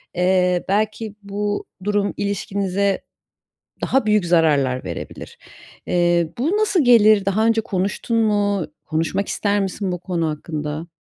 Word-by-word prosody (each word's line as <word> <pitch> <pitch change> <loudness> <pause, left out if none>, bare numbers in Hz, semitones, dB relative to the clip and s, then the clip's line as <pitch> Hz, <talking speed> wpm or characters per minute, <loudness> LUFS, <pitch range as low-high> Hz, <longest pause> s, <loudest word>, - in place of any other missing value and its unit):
eee, 180 0 +2
belki 215 +1 -1
bu 205 +1 -3 0.2
durum 205 0 0
ilişkinize 200 -1 -1 0.8
daha 270 -4 +1
büyük 210 -3 +2
zararlar 145 -7 +2
verebilir. 85 -3 -7 0.5
Eee, 175 -2 +2
bu 315 - +1
nasıl 410 -6 +2
gelir? 215 -4 +6
Daha 200 +3 +1
önce 225 0 +3
konuştun 205 +2 -2
mu? 205 -4 +1 0.2
Konuşmak 165 +5 -1
ister 205 0 0
misin 195 0 -2
bu 180 - -3
konu 170 -2 -2
hakkında? 150 +1 -5
200 Hz, 125 wpm, -21 LUFS, 175-210 Hz, 0.8 s, gelir